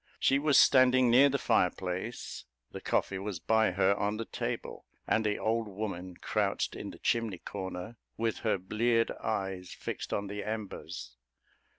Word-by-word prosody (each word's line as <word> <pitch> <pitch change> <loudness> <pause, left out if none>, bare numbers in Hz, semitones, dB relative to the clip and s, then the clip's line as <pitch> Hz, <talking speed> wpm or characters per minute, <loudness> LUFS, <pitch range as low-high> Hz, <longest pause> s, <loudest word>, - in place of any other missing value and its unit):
She 135 - +3
was 145 -1 +4
standing 130 -2 +6
near 135 +4 +7
the 140 - +1
fireplace, 90 0 -1 0.3
the - - -7
coffee 95 - 0
was 100 -1 -4
by 110 +2 +3
her, 95 +1 +3
on 105 +1 -1
the 115 - -3
table, - - -4 0.2
and 110 - +2
the 105 -1 0
old 110 0 0
woman 95 -3 -5
crouched - - -1
in - - -6
the - - -10
chimney 115 -5 0
corner, 95 +3 -6 0.2
with 115 -1 0
her 110 -3 +1
bleared 115 +5 +1
eyes 95 -4 -2
fixed - - -5
on 100 - -1
the 100 +1 -5
embers. 85 - -6
105 Hz, 160 wpm, -31 LUFS, 95-115 Hz, 0.3 s, near